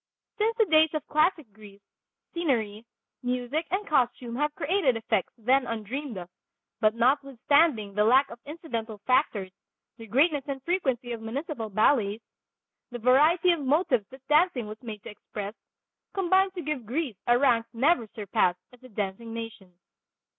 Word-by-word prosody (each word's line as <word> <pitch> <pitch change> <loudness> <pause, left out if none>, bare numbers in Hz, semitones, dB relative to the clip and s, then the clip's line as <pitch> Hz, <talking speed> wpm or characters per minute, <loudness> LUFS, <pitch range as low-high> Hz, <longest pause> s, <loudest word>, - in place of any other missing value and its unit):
Since 450 +2 +1
the 445 - +4
days 315 -3 +5
of 305 - -3
classic 305 - +1
Greece, 200 -1 -15 0.5
scenery, 230 -10 -1 0.4
music 250 +6 -2
and 390 +4 -1
costume 245 -6 0
have 295 +3 -1
created 290 -6 +1
effects 220 -4 -1
then 255 +3 +2
undreamed 230 +3 -4
of, 175 -1 -7 0.5
but 215 -1 +3
notwithstanding 270 -2 +2
the 210 +1 +2
lack 260 +5 +4
of 235 - -10
incidental 240 -9 -5
factors, 245 -8 +1 0.5
the 225 -1 -11
greatness 285 - +2
and 275 -1 -3
frequency 265 -9 -1
of 230 -1 -5
municipal 230 0 -4
ballets, 215 0 +2 0.7
the 245 - -6
variety 300 +9 +4
of 340 - 0
motives 280 - +1
that 265 0 -15
dancing 300 -5 +3
was 215 +1 -9
made 215 -5 -8
to - - -8
express, 205 0 -7 0.6
combine 380 0 +3
to 355 - -5
give 285 -6 -4
Greece 260 - -2
a 240 0 +5
rank 240 -4 +2
never 255 0 +2
surpassed 195 -4 0 0.2
as 250 - -18
a 255 - -13
dancing 210 +2 -4
nation. 225 -5 -8
250 Hz, 155 wpm, -27 LUFS, 220-300 Hz, 0.7 s, days